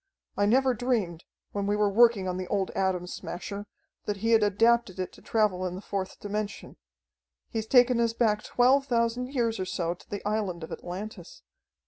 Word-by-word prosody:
I 205 Hz, -, +2 dB
never 260 Hz, +3 st, +4 dB
dreamed, 215 Hz, -8 st, -1 dB, 0.3 s
when 200 Hz, -1 st, -2 dB
we 205 Hz, -, +2 dB
were 210 Hz, 0 st, +2 dB
working 210 Hz, -2 st, +4 dB
on 180 Hz, 0 st, -2 dB
the 185 Hz, -1 st, -4 dB
old 195 Hz, -2 st, -1 dB
Atom 190 Hz, -2 st, 0 dB
Smasher, 200 Hz, +3 st, -6 dB, 0.4 s
that 205 Hz, -1 st, -2 dB
he 225 Hz, +3 st, 0 dB
had 225 Hz, -1 st, +6 dB
adapted 210 Hz, 0 st, +3 dB
it 185 Hz, -, -3 dB
to -, -, -17 dB
travel 210 Hz, -5 st, +1 dB
in 180 Hz, -, -5 dB
the 185 Hz, -, -7 dB
fourth 195 Hz, -2 st, -4 dB
dimension. 210 Hz, 0 st, -5 dB, 0.7 s
He's 220 Hz, -1 st, -3 dB
taken 245 Hz, 0 st, +5 dB
us 230 Hz, -1 st, +2 dB
back 215 Hz, -3 st, +2 dB
twelve 265 Hz, +5 st, +3 dB
thousand 235 Hz, 0 st, +1 dB
years 230 Hz, -5 st, 0 dB
or 185 Hz, -, -1 dB
so 170 Hz, -2 st, -2 dB
to 175 Hz, -, -19 dB
the 205 Hz, 0 st, -4 dB
island 200 Hz, -6 st, -2 dB
of 160 Hz, -, -8 dB
Atlantis. 185 Hz, 0 st, -7 dB
210 Hz, 185 wpm, -28 LUFS, 190-230 Hz, 0.7 s, had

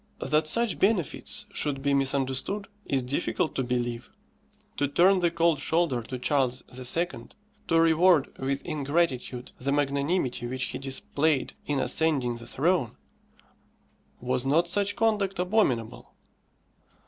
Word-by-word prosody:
That 155 Hz, 0 st, +3 dB
such 230 Hz, +2 st, +1 dB
benefits 195 Hz, -6 st, +1 dB
should 135 Hz, -2 st, -2 dB
be 140 Hz, 0 st, +2 dB
misunderstood 135 Hz, +8 st, 0 dB, 0.2 s
is 135 Hz, -2 st, 0 dB
difficult 145 Hz, +5 st, -1 dB
to -, -, -1 dB
believe. 120 Hz, -1 st, -3 dB, 0.7 s
To 145 Hz, -, +1 dB
turn 180 Hz, +7 st, +4 dB
the 175 Hz, -1 st, +2 dB
cold 170 Hz, -2 st, +2 dB
shoulder 160 Hz, -5 st, +1 dB
to 125 Hz, +3 st, -6 dB
Charles 130 Hz, -1 st, 0 dB
II., 130 Hz, +7 st, +1 dB, 0.6 s
to 165 Hz, -, +3 dB
reward 165 Hz, -1 st, +4 dB
with 135 Hz, +1 st, -2 dB
ingratitude 140 Hz, -5 st, -1 dB
the 140 Hz, +2 st, -2 dB
magnanimity 140 Hz, -2 st, 0 dB
which 130 Hz, +2 st, -2 dB
he -, -, -3 dB
displayed 140 Hz, +1 st, 0 dB
in 145 Hz, -2 st, 0 dB
ascending 135 Hz, -8 st, 0 dB
the 120 Hz, 0 st, -11 dB
throne 150 Hz, -1 st, 0 dB, 1.2 s
was 125 Hz, 0 st, -1 dB
not 155 Hz, +6 st, +2 dB
such 200 Hz, +3 st, 0 dB
conduct 205 Hz, -4 st, +1 dB
abominable? 180 Hz, -, 0 dB
145 Hz, 125 wpm, -27 LUFS, 130-170 Hz, 1.2 s, turn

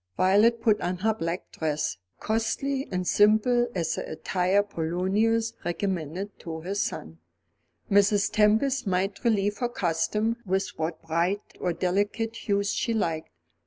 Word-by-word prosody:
Violet 210 Hz, +5 st, +4 dB
put 215 Hz, -2 st, +3 dB
on 180 Hz, +1 st, -1 dB
her 220 Hz, -, +4 dB
black 170 Hz, -3 st, -4 dB
dress, 155 Hz, -, -2 dB, 0.2 s
costly 265 Hz, +5 st, -1 dB
and 180 Hz, -1 st, -2 dB
simple 220 Hz, +5 st, +4 dB
as 170 Hz, -3 st, 0 dB
the -, -, -5 dB
attire 180 Hz, +5 st, +1 dB
Polonius 205 Hz, +5 st, 0 dB
recommended 180 Hz, +1 st, -3 dB
to 160 Hz, -1 st, -6 dB
his 195 Hz, +4 st, -2 dB
son. 80 Hz, +1 st, -4 dB, 0.7 s
Mrs. 200 Hz, 0 st, +4 dB
Tempest 220 Hz, +5 st, +2 dB
might 195 Hz, +2 st, -1 dB
relieve 205 Hz, -3 st, +1 dB
her 245 Hz, -, 0 dB
costume 210 Hz, +4 st, 0 dB
with 195 Hz, -1 st, 0 dB
what 160 Hz, +1 st, -4 dB
bright 170 Hz, +5 st, 0 dB, 0.2 s
or 180 Hz, -, 0 dB
delicate 205 Hz, +6 st, -1 dB
hues 200 Hz, -2 st, 0 dB
she 230 Hz, -, -1 dB
liked. 165 Hz, -7 st, -1 dB
200 Hz, 135 wpm, -27 LUFS, 175-220 Hz, 0.7 s, Violet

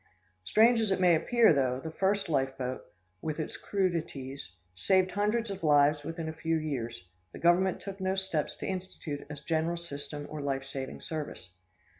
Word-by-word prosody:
Strange 225 Hz, -, +5 dB
as 220 Hz, -, +1 dB
it 190 Hz, -, +1 dB
may 180 Hz, -2 st, +6 dB
appear, 225 Hz, +5 st, +5 dB
though 130 Hz, -3 st, +1 dB
the 160 Hz, +4 st, -6 dB
first 195 Hz, +4 st, +1 dB
life 135 Hz, -4 st, 0 dB
boat, 130 Hz, 0 st, -3 dB, 0.4 s
with 155 Hz, 0 st, -3 dB
its 155 Hz, -, -3 dB
crudities, 160 Hz, -, -2 dB, 0.2 s
saved 185 Hz, -, +2 dB
hundreds 210 Hz, +2 st, 0 dB
of 195 Hz, -2 st, -6 dB
lives 145 Hz, -1 st, +5 dB
within 165 Hz, +1 st, -4 dB
a 160 Hz, -, -3 dB
few 165 Hz, 0 st, 0 dB
years, 120 Hz, -, -4 dB, 0.3 s
the -, -, -8 dB
Government 175 Hz, +2 st, +3 dB
took 195 Hz, 0 st, -7 dB
no 190 Hz, 0 st, +1 dB
steps 190 Hz, -6 st, -1 dB
to -, -, -6 dB
institute 180 Hz, -6 st, -4 dB
a 150 Hz, -, -5 dB
general 160 Hz, +3 st, -1 dB
system 145 Hz, -3 st, -5 dB
or 155 Hz, -1 st, -6 dB
life 135 Hz, -1 st, -1 dB
saving 135 Hz, -1 st, -6 dB
service. 150 Hz, -, -5 dB
160 Hz, 175 wpm, -30 LUFS, 140-190 Hz, 0.4 s, may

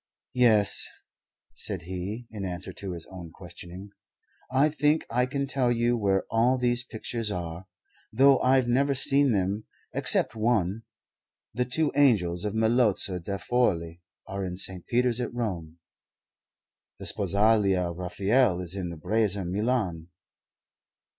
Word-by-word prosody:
"Yes," 110 Hz, -5 st, +4 dB, 0.7 s
said 95 Hz, -5 st, -4 dB
he 95 Hz, +7 st, -5 dB
in 105 Hz, -3 st, -6 dB
answer 90 Hz, 0 st, -5 dB
to 95 Hz, -2 st, -6 dB
his 85 Hz, -2 st, -7 dB
own 90 Hz, -3 st, -9 dB
questioning, 90 Hz, +3 st, -10 dB, 0.6 s
"I 135 Hz, +4 st, +4 dB
think 150 Hz, +1 st, +1 dB
I 125 Hz, +2 st, +2 dB
can 140 Hz, +1 st, -2 dB
tell 135 Hz, -3 st, 0 dB
you 120 Hz, 0 st, +1 dB
where 100 Hz, -4 st, +1 dB
all 120 Hz, +3 st, +3 dB
these 120 Hz, -1 st, +1 dB
pictures 115 Hz, -1 st, -4 dB
are, 85 Hz, 0 st, -5 dB, 0.4 s
though 135 Hz, +3 st, +5 dB
I've 130 Hz, -1 st, +3 dB
never 135 Hz, +3 st, +2 dB
seen 140 Hz, 0 st, +3 dB
them, 100 Hz, +1 st, -1 dB, 0.3 s
except 110 Hz, -, +1 dB
one. 110 Hz, -3 st, 0 dB, 0.7 s
The 125 Hz, +3 st, 0 dB
two 145 Hz, +5 st, 0 dB
angels 100 Hz, -12 st, +3 dB
by -, -, +1 dB
Melozzo 110 Hz, -3 st, +1 dB
da 100 Hz, +3 st, -4 dB
Forli 90 Hz, -8 st, 0 dB, 0.2 s
are 100 Hz, 0 st, -5 dB
in 90 Hz, -1 st, -4 dB
St. 95 Hz, -2 st, -3 dB
Peter's 125 Hz, 0 st, +1 dB
at -, -, -3 dB
Rome. 85 Hz, -9 st, -4 dB, 1.2 s
The -, -, -9 dB
Sposalia 100 Hz, -2 st, +2 dB
of 85 Hz, -, -10 dB
Raphael 95 Hz, +3 st, +1 dB
is 90 Hz, 0 st, -2 dB
in 95 Hz, -3 st, -4 dB
the 85 Hz, -, -7 dB
Breza, 100 Hz, +2 st, 0 dB
Milan. 95 Hz, -4 st, -1 dB
105 Hz, 140 wpm, -27 LUFS, 90-125 Hz, 1.2 s, though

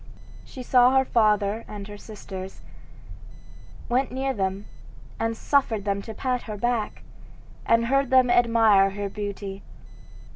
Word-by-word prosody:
She 255 Hz, -, -10 dB
saw 250 Hz, +1 st, +4 dB
her 265 Hz, -, +3 dB
father 215 Hz, -2 st, +1 dB
and 205 Hz, -1 st, -8 dB
her 205 Hz, -, -9 dB
sisters, 195 Hz, -3 st, -9 dB, 1.2 s
went 255 Hz, +1 st, 0 dB
near 265 Hz, +1 st, -2 dB
them, 195 Hz, -2 st, -3 dB, 0.5 s
and 225 Hz, 0 st, -1 dB
suffered 225 Hz, -8 st, 0 dB
them 200 Hz, -1 st, -1 dB
to 220 Hz, +1 st, -9 dB
pat 250 Hz, +1 st, -2 dB
her 210 Hz, -, -5 dB
back, 235 Hz, 0 st, -2 dB, 0.6 s
and 230 Hz, 0 st, +3 dB
heard 275 Hz, +2 st, +1 dB
them 255 Hz, -2 st, +4 dB
admire 225 Hz, -5 st, +4 dB
her 200 Hz, +1 st, -5 dB
beauty. 200 Hz, -1 st, -6 dB
225 Hz, 135 wpm, -25 LUFS, 200-250 Hz, 1.2 s, saw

